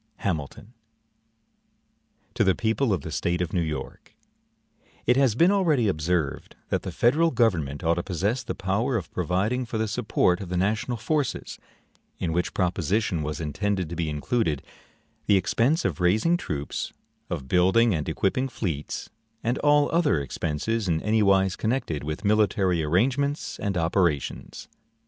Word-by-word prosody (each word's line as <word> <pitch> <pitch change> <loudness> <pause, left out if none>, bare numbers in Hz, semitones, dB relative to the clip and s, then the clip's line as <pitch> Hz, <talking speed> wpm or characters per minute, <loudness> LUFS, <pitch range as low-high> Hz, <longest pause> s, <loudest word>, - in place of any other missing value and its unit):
HAMILTON 95 - -4 1.6
To - - +2
the 95 - +3
People 115 +2 0
of 95 - 0
the 80 - -7
State 85 +2 -1
of 90 -2 -2
New 90 - +2
York: 80 -2 -6 0.9
IT 125 - +4
HAS 130 -5 +3
been 170 +9 +5
already 160 - +2
observed 80 -4 -1
that - - 0
the - - -5
federal 155 +8 +3
government 85 - 0
ought 85 0 +3
to - - +1
possess 100 +8 -1
the 120 - -5
power 100 +6 0
of 90 -7 -6
providing 95 +8 0
for 115 -2 -4
the 110 0 0
support 100 -4 +1
of 95 - -6
the 90 - -1
national 110 +6 0
forces; 145 +6 -2 0.6
in 80 -2 -2
which 90 +1 -1
proposition 90 0 0
was 75 0 -3
intended 90 +3 -2
to 85 - -5
be 80 -2 -1
included 75 - -1 0.6
the 100 - +5
expense 125 - +1
of - - -1
raising 110 - +3
troops, 75 - -4 0.4
of 65 - -4
building 95 - +4
and 80 -1 -2
equipping 115 +11 0
fleets, 90 - -4 0.3
and 120 +2 0
all 145 0 +4
other 165 - +2
expenses 80 - -2
in 80 -2 +1
any 110 +1 +2
wise 95 -1 +3
connected 110 - -2
with 75 +7 -5
military 100 -4 +2
arrangements 135 - 0
and 100 -3 -1
operations. 85 -3 -1
95 Hz, 155 wpm, -25 LUFS, 85-120 Hz, 1.6 s, been